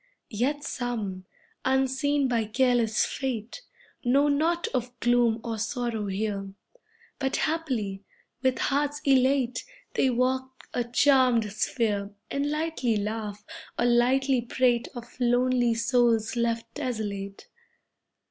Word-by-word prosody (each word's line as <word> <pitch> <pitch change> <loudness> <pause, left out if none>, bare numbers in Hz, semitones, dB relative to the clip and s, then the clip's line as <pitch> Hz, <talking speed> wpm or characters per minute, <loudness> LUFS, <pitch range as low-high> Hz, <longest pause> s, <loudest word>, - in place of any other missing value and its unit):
Yet 270 +7 -1
some, 215 -9 -4 0.4
unseen 265 +2 +1
by 235 -3 +1
careless 240 -1 +2
Fate, 250 - -4 0.4
Know 275 +4 +3
naught 325 +4 +1
of 245 -1 -3
gloom 240 -1 +3
or 225 -2 -3
sorrow 230 -2 -2
here. 195 0 -3 0.6
But 265 -1 0
happily, 245 -12 -1 0.4
with 260 -1 +2
hearts 290 +1 0
elate, 260 -2 +3 0.3
They 265 - +2
walk 260 +1 -1
a 245 - 0
charmed 245 -4 +3
sphere, 210 -3 -1 0.2
And 280 +1 0
lightly 300 -7 0
laugh, 210 0 -4 0.3
or 240 - +1
lightly 250 +2 +3
prate 240 0 +1
Of 240 +1 -10
lonely 245 -1 +2
souls 230 -2 +2
left 230 -1 -1
desolate. 205 -7 -4
245 Hz, 110 wpm, -27 LUFS, 225-265 Hz, 0.6 s, Know